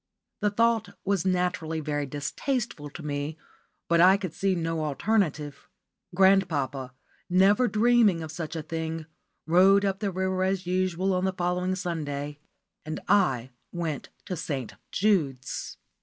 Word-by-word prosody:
The 210 - +2
thought 230 +1 +1
was 195 -2 +1
naturally 180 -3 0
very 145 -2 -2
distasteful 145 - -3
to 155 +3 -10
me, 145 +2 -3 0.5
but 170 0 +4
I 190 +2 +7
could 185 -5 -5
see 195 -1 +1
no 165 -2 -1
alternative. 150 -2 -1 0.5
Grandpapa, 150 -9 +2 0.3
never 195 +7 +4
dreaming 220 -6 +3
of 155 - -6
such 165 0 -5
a 160 - -3
thing, 160 0 -4 0.4
rowed 190 +4 +5
up 195 -1 -1
the 205 -1 -1
river 190 0 -1
as 190 0 0
usual 185 +1 0
on 185 0 +1
the 190 - +1
following 180 +1 -1
Sunday, 150 -5 -4 0.4
and 155 +1 -5
I 135 - +2 0.2
went 165 -5 -4 0.2
to 180 - -3
St. 140 -7 -4 0.2
Jude's. 160 -11 0
175 Hz, 140 wpm, -27 LUFS, 155-195 Hz, 0.5 s, I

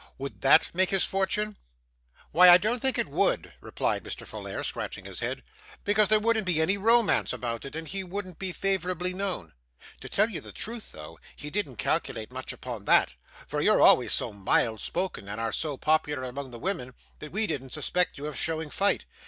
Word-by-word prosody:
Would 135 +1 -7
that 135 - +5
make 185 +1 +2
his 195 -1 +2
fortune?' 205 +2 -1 0.7
'Why, 180 +3 +8
I 175 - +10
don't 220 +5 0
think 265 -1 +3
it - - +2
would,' - - 0
replied - - -2
Mr. - - -7
Folair, - - -6
scratching - - -5
his - - -5
head, - - -3 0.4
'because 210 0 +3
there 215 0 +6
wouldn't 220 -2 +2
be 170 -3 +2
any 160 +5 +3
romance 225 +2 +3
about 115 0 -4
it, 140 - -8
and 160 0 -5
he 195 +4 -4
wouldn't 185 -1 -5
be 190 -1 -3
favourably 185 -1 -1
known. 185 - -3 0.5
To - - -9
tell 215 - +3
you - - -4
the - - -11
truth 230 0 -5
though, 75 0 -10 0.2
he 150 +1 -8
didn't 185 -10 -2
calculate 110 +1 -2
much 130 0 -4
upon 120 -5 -7
that, - - +4 0.3
for - - -3
you're - - +4
always - - +6
so - - 0
mild 105 +3 +1
spoken, 180 - -3
and 105 +2 -5
are 115 -1 -1
so 150 +1 -2
popular 150 -3 +1
among 130 +2 -5
the 120 - -9
women, 130 -6 -3 0.2
that 150 - -9
we 220 +4 +1
didn't 140 -7 -4
suspect 165 +6 -1
you 140 - -6
of 150 -1 -5
showing 160 -2 -2
fight. 200 +1 +1
175 Hz, 200 wpm, -27 LUFS, 135-200 Hz, 0.7 s, I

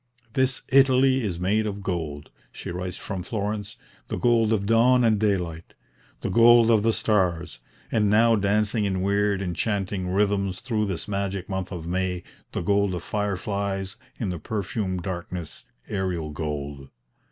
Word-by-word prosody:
"This 130 0 +1
Italy 130 0 +5
is 90 -5 -2
made 105 +4 +1
of 100 -1 -5
gold," 80 -6 -4 0.2
she - - -7
writes 90 +1 -4
from 95 -3 -5
Florence, 105 +1 -3 0.3
"the - - -3
gold 115 -2 +3
of 100 -3 +1
dawn 120 +3 +4
and 110 -3 +3
daylight, 90 -6 -1 0.5
the - - -2
gold 115 0 +7
of 110 -2 +4
the 115 +2 +3
stars, 90 - 0 0.3
and, 105 -2 +2
now 115 +2 +5
dancing 105 +1 +1
in 95 -2 -1
weird 100 0 +1
enchanting 95 0 -2
rhythms 100 -1 +1
through 110 -4 -1
this 95 -1 -4
magic 100 -2 -2
month 95 -1 -3
of 85 -4 -6
May, 90 0 -1 0.3
the - - -3
gold 100 +1 +1
of 85 - -5
fireflies 100 -1 -2 0.2
in 110 - -1
the 90 -2 -4
perfumed 95 -1 -3
darkness 90 -2 -6 0.2
'aerial 90 -6 -2
gold.' 75 -2 -5
100 Hz, 150 wpm, -25 LUFS, 90-110 Hz, 0.5 s, gold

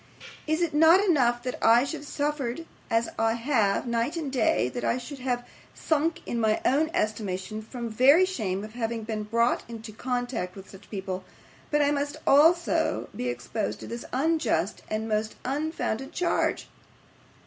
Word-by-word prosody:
Is 315 +3 +1
it 330 -3 -1
not 320 +4 +7
enough 255 -11 +2
that 250 - -4
I 230 +2 +6
should 305 +2 -4
have 290 - -11
suffered 290 0 -2 0.2
as 230 +1 +1
I 225 0 +3
have, 230 -5 +1
night 235 +7 -1
and 300 -5 -3
day; 320 +5 +2
that 245 - -5
I 240 - +1
should 265 +3 -8
almost 250 -1 -1
have - - -23 0.3
sunk 325 +2 0
in 235 - -2
my 220 -1 +2
own 300 +5 +3
estimation 215 - -2
from 235 +2 -6
very 270 +11 +5
shame 205 - -2
of 215 0 -9
having 230 -1 -3
been 215 -1 -3
brought 230 +3 +1
into 225 -1 -8
contact 245 -5 -3
with 195 -1 -11
such 195 +1 -14
people; 190 -2 -4 0.5
but 295 0 +2
must 285 +1 -2
I - - -14
also 330 +5 +3
be 125 - -3
exposed 120 -4 -3
to - - -7
this 235 0 -6
unjust 255 - 0
and 215 +1 -2
most 215 0 -1
unfounded 275 -1 -2
charge! 355 -1 0
245 Hz, 170 wpm, -27 LUFS, 220-295 Hz, 0.5 s, not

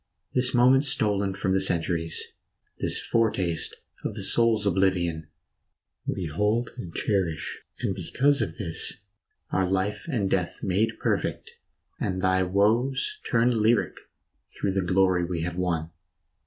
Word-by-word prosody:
This 125 0 +2
moment 130 +3 +5
stolen 100 -8 +1
from 95 -1 0
the 95 - +3
centuries, 85 -3 0 0.6
This - - +1
foretaste 95 -8 0 0.3
of - - -3
the - - -3
soul's 115 -3 +2
oblivion 90 -5 +1 0.8
We 95 - -2
hold 105 +9 0
and 95 -9 -7
cherish, 90 -5 -1 0.2
and 115 -6 0
because 135 - +1
of - - -3
this 85 -7 0 0.6
Are 95 -1 +1
life 95 - -1
and 115 -11 0
death 90 -2 -1
made 100 +4 +1
perfect, - - -1 0.5
and 95 0 -1
thy 95 0 +2
woes 115 - +1
Turn 115 -1 +3
lyric 110 -4 +2 0.5
through 100 - -2
the 95 0 0
glory 90 0 +2
we 85 -1 -2
have 85 0 -3
won. 85 -3 -1
95 Hz, 135 wpm, -26 LUFS, 90-115 Hz, 0.8 s, moment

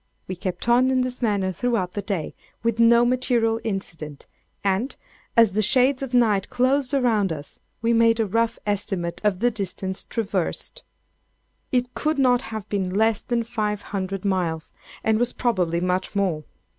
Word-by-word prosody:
We 185 - -4
kept 180 +3 -4
on 245 +2 +5
in 260 -1 +2
this 250 0 -3
manner 200 -5 +1
throughout 200 -1 -1
the 205 - -3
day, 195 -5 -3 0.3
with 230 -1 0
no 235 +1 +6
material 240 -2 +1
incident, 165 -9 -5 0.4
and, 200 +7 0 0.4
as 230 -3 +6
the 210 +3 +1
shades 255 +5 +3
of 270 -2 -4
night 220 -6 +3
closed 265 +2 +1
around 220 -8 +2
us, 145 -2 -7 0.2
we 230 +1 +3
made 230 0 +4
a 225 - +3
rough 230 +3 0
estimate 195 -4 -2
of 205 -2 +1
the 245 +1 +3
distance 190 -2 -3
traversed. 210 - -2 0.9
It 250 -1 0
could 310 0 -1
not 250 -2 +4
have 220 -3 -6
been 195 -3 -1
less 220 0 +2
than 240 -1 -1
five 210 -3 -2
hundred 195 0 -3
miles, 175 -5 -1 0.3
and 220 0 +2
was 245 0 +1
probably 180 -9 0
much 180 +3 -1
more. 180 -7 0
215 Hz, 165 wpm, -24 LUFS, 190-240 Hz, 0.9 s, no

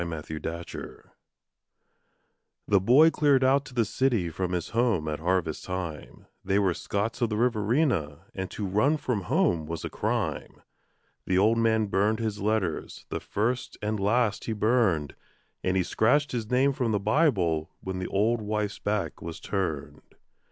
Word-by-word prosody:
9 85 - -5
Autoplay 80 +1 -6 1.6
The 100 - +4
boy 135 - +6
cleared 145 -4 +3
out 135 +2 +3
to 130 - -12
the 115 -2 +3
city 110 -7 0
from 90 +2 -3
his 90 -2 -2
home 110 -9 +1
at 75 -1 -2
harvest 85 -1 -1
time 90 -5 -6 0.2
They 95 +1 +1
were 95 -3 +2
Scots 105 +8 -3
of 120 - +2
the 105 - -2
Riverina, 110 - +1
and 95 -1 -4
to 105 - -4
run 105 +11 +2
from 125 -8 -2
home 80 -1 +1
was 85 0 -5
a - - -5
crime. - - -3 0.6
The 90 - +2
old 110 +4 +4
man 110 -1 +2
burned 105 +2 +1
his 110 -2 -3
letters, 105 -6 -2
the - - -3
first 120 +5 -2
and 105 0 -2
last 105 +1 +1
he 115 - -2
burned, 105 - +1 0.5
And 95 +1 +1
he 95 - +2
scratched 135 - +2
his 115 -3 -3
name 135 +2 +3
from 120 -4 -1
the 105 - +1
Bible 100 - +1
when 95 -1 -4
the 95 - -3
old 110 +4 +1
wife's 105 -1 -2
back 105 -1 -2
was 85 0 -6
turned. 75 -7 -3
105 Hz, 165 wpm, -27 LUFS, 90-120 Hz, 1.6 s, boy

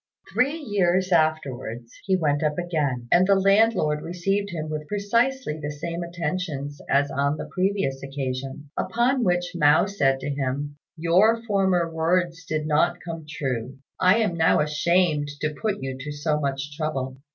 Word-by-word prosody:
Three 275 +6 +2
years 190 - +1
afterwards 135 -8 0
he 190 - +2
went 145 -5 +1
up 150 -1 0
again, 150 -9 -1
and 180 +1 +5
the 200 - +5
landlord 195 -6 +3
received 195 +5 -1
him 160 -4 -4
with 155 -1 -5
precisely 230 - 0
the 150 - -3
same 165 +4 -5
attentions 165 -4 -4
as 140 +1 +2
on 140 +2 0
the - - -5
previous 185 -8 -1
occasion; 135 +1 -5
upon 245 +2 +1
which 180 -2 +1
Mao 150 -2 +4
said 135 -10 +1
to 145 - -3
him, 140 +1 -3 0.2
"Your 195 +8 +3
former 190 -5 +2
words 165 +1 0
did 155 -1 -2
not 155 +3 +2
come 165 -3 -7
true; 130 -4 -3 0.2
I 185 +4 +5
am 210 -6 +1
now 160 -1 +3
ashamed 150 0 +2
to 155 0 -1
put 205 0 -3
you 135 -1 -3
to 145 +2 -5
so 150 +1 -1
much 140 0 -3
trouble." 135 -4 -3
160 Hz, 160 wpm, -24 LUFS, 145-185 Hz, 0.2 s, and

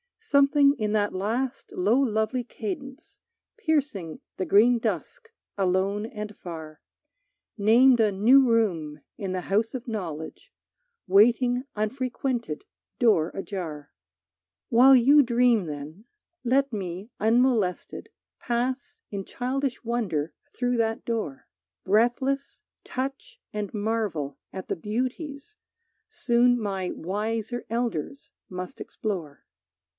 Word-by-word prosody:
Something 280 -8 +4
in 210 -1 0
that 205 -1 +1
last 230 +7 -2
low 210 +8 +2
lovely 230 -1 0
cadence 270 - -7 0.4
Piercing 285 - -1 0.2
the 185 - -1
green 235 +5 +5
dusk 455 - -4 0.3
alone 195 +2 0
and 210 -2 -7
far, 160 -3 -8 0.8
Named 240 +5 +5
a 215 -2 +4
new 250 +7 +5
room 165 -10 0 0.2
in 195 -4 -4
the 185 - -2
house 215 +5 0
of 250 -1 -6
knowledge, 170 -9 -6 0.6
Waiting 245 +6 +4
unfrequented, 240 - -2 0.3
door 210 -10 +3
ajar. 165 -7 -6 0.8
While 260 +3 +7
you 275 +4 +7
dream 240 -5 +3
then, 155 +6 -8 0.4
let 270 +2 +2
me 190 +2 -5
unmolested 225 -4 +1 0.3
Pass 260 +8 -2
in 200 -2 -4
childish 265 +1 -3
wonder 210 -11 -1 0.2
through 245 -1 0
that 225 0 0
door, 215 - -3 0.4
Breathless, 245 +7 +1 0.2
touch 275 - -5
and 210 -1 -3
marvel 205 -10 -2
at 190 -1 -6
the - - -1
beauties 265 - -4 0.5
Soon 245 0 +3
my 195 -4 -2
wiser 220 +6 -3
elders 235 - -3 0.2
must 185 0 -7
explore. 175 -10 -5
225 Hz, 110 wpm, -26 LUFS, 195-255 Hz, 0.8 s, While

